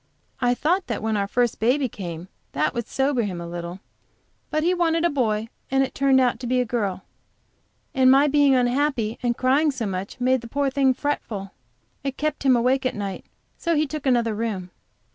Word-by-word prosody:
I 245 Hz, -1 st, +2 dB
thought 345 Hz, +9 st, 0 dB
that 230 Hz, -3 st, -3 dB
when 220 Hz, -1 st, 0 dB
our 200 Hz, -1 st, 0 dB
first 240 Hz, +2 st, 0 dB
baby 255 Hz, +5 st, +2 dB
came 175 Hz, -5 st, -7 dB, 0.3 s
that -, -, 0 dB
would 235 Hz, -1 st, -3 dB
sober 270 Hz, -2 st, +1 dB
him 190 Hz, -5 st, -3 dB
a 170 Hz, -, -6 dB
little, 170 Hz, +2 st, -6 dB, 0.7 s
but 310 Hz, 0 st, 0 dB
he 355 Hz, +2 st, +3 dB
wanted 335 Hz, -2 st, +1 dB
a 345 Hz, -, +2 dB
boy 225 Hz, -5 st, 0 dB, 0.2 s
and 270 Hz, 0 st, +3 dB
it 265 Hz, -, -4 dB
turned 270 Hz, -1 st, +3 dB
out 245 Hz, -3 st, +2 dB
to 245 Hz, -, -5 dB
be 255 Hz, +1 st, +2 dB
a 250 Hz, -, +1 dB
girl. 205 Hz, -6 st, -2 dB, 0.9 s
And 260 Hz, -1 st, +5 dB
my 270 Hz, +2 st, +6 dB
being 285 Hz, -1 st, +4 dB
unhappy 250 Hz, -2 st, +1 dB
and 240 Hz, -1 st, 0 dB
crying 275 Hz, +5 st, +3 dB
so 260 Hz, -5 st, -3 dB
much, 195 Hz, +3 st, -5 dB
made 255 Hz, 0 st, +2 dB
the 235 Hz, -, -9 dB
poor 280 Hz, +3 st, 0 dB
thing 265 Hz, -1 st, +3 dB
fretful; 215 Hz, -10 st, -3 dB, 0.5 s
it 275 Hz, -1 st, -3 dB
kept 305 Hz, -1 st, -2 dB
him 265 Hz, -2 st, +4 dB
awake 255 Hz, +3 st, +2 dB
at 255 Hz, -, -1 dB
night, 200 Hz, -2 st, -5 dB, 0.3 s
so 335 Hz, -1 st, 0 dB
he 305 Hz, +1 st, +2 dB
took 300 Hz, -1 st, -5 dB
another 235 Hz, -3 st, +2 dB
room. 205 Hz, -5 st, -3 dB
250 Hz, 200 wpm, -24 LUFS, 220-275 Hz, 0.9 s, my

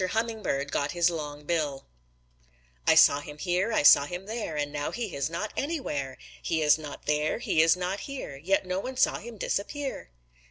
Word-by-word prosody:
HUMMINGBIRD 210 Hz, -9 st, -1 dB
GOT 145 Hz, +1 st, 0 dB
HIS 175 Hz, 0 st, +3 dB
LONG 150 Hz, -2 st, -6 dB
BILL 150 Hz, -4 st, -2 dB, 1.0 s
"I -, -, +6 dB
saw 140 Hz, -, +7 dB
him 150 Hz, 0 st, -10 dB
here; 180 Hz, +6 st, 0 dB
I 215 Hz, -, +2 dB
saw 140 Hz, -1 st, +8 dB
him 180 Hz, +5 st, -6 dB
there; 215 Hz, -7 st, -4 dB
And 145 Hz, -1 st, -2 dB
now 145 Hz, 0 st, -2 dB
he 230 Hz, -6 st, -4 dB
is 140 Hz, +2 st, -1 dB
not 170 Hz, +6 st, -4 dB
anywhere! 150 Hz, -, -3 dB, 0.2 s
He 160 Hz, -1 st, 0 dB
is 150 Hz, +1 st, +5 dB
not 150 Hz, -2 st, -9 dB
there; 150 Hz, +1 st, +1 dB
he 195 Hz, -8 st, +2 dB
is 165 Hz, +2 st, +4 dB
not 180 Hz, +2 st, -2 dB
here, 275 Hz, -, -6 dB
Yet 190 Hz, +6 st, 0 dB
no 185 Hz, +1 st, -2 dB
one 255 Hz, +5 st, -6 dB
saw -, -, +3 dB
him 235 Hz, -1 st, -10 dB
disappear." 265 Hz, -, -3 dB
170 Hz, 190 wpm, -28 LUFS, 145-215 Hz, 1.0 s, saw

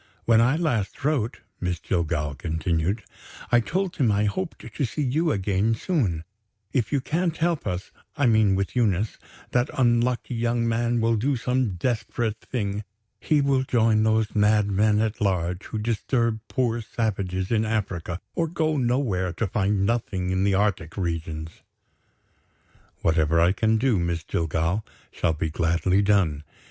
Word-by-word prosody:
When 115 Hz, -1 st, +5 dB
I 125 Hz, +5 st, +3 dB
last 145 Hz, -, -1 dB
wrote," 135 Hz, -7 st, 0 dB, 0.2 s
Miss 90 Hz, -2 st, -2 dB
Jillgall 80 Hz, -4 st, -1 dB
continued, 80 Hz, -, -1 dB, 0.5 s
"I 120 Hz, -, +6 dB
told 185 Hz, +8 st, -2 dB
him 120 Hz, -6 st, +3 dB
I 105 Hz, +1 st, +2 dB
hoped 175 Hz, -, -4 dB
to 145 Hz, -, -2 dB
see 140 Hz, +5 st, -1 dB
you 155 Hz, +5 st, +1 dB
again 100 Hz, +2 st, +1 dB
soon. 110 Hz, -, -1 dB, 0.5 s
If 115 Hz, -6 st, 0 dB
you 140 Hz, -, +1 dB
can't 165 Hz, +3 st, -1 dB
help 165 Hz, -1 st, 0 dB
us 90 Hz, +1 st, -3 dB, 0.3 s
(I 140 Hz, -, +2 dB
mean 110 Hz, -4 st, +4 dB
with 100 Hz, +4 st, -2 dB
Eunice) 110 Hz, -3 st, +1 dB, 0.3 s
that 125 Hz, 0 st, +2 dB
unlucky 120 Hz, 0 st, +2 dB
young 115 Hz, 0 st, 0 dB
man 115 Hz, +1 st, +1 dB
will 115 Hz, 0 st, +2 dB
do 135 Hz, +6 st, +1 dB
some 125 Hz, -4 st, 0 dB
desperate 110 Hz, +1 st, -2 dB
thing. 105 Hz, -4 st, -3 dB, 0.4 s
He 150 Hz, -2 st, +2 dB
will 140 Hz, -1 st, +2 dB
join 115 Hz, -4 st, +2 dB
those 110 Hz, 0 st, +2 dB
madmen 105 Hz, 0 st, +3 dB
at 110 Hz, 0 st, -2 dB
large 90 Hz, -2 st, 0 dB
who -, -, -5 dB
disturb 115 Hz, +1 st, 0 dB
poor 120 Hz, -3 st, 0 dB
savages 95 Hz, -4 st, -2 dB
in 110 Hz, -1 st, +3 dB
Africa, 95 Hz, -6 st, -2 dB
or 165 Hz, -, 0 dB
go 155 Hz, -2 st, 0 dB
nowhere 120 Hz, -8 st, 0 dB
to 115 Hz, -, -1 dB
find 100 Hz, 0 st, +1 dB
nothing 100 Hz, -5 st, -1 dB
in 95 Hz, +1 st, +1 dB
the 100 Hz, -1 st, +2 dB
Arctic 95 Hz, -5 st, 0 dB
regions. 80 Hz, -3 st, -4 dB, 1.4 s
"Whatever 80 Hz, 0 st, +3 dB
I 85 Hz, +2 st, +5 dB
can 110 Hz, +3 st, +2 dB
do, 120 Hz, -4 st, +2 dB
Miss 85 Hz, -1 st, -1 dB
Jillgall, 80 Hz, +6 st, -1 dB, 0.3 s
shall 80 Hz, -, 0 dB
be 80 Hz, 0 st, -2 dB
gladly 85 Hz, +4 st, +2 dB
done. 100 Hz, -8 st, +2 dB
110 Hz, 155 wpm, -25 LUFS, 90-120 Hz, 1.4 s, I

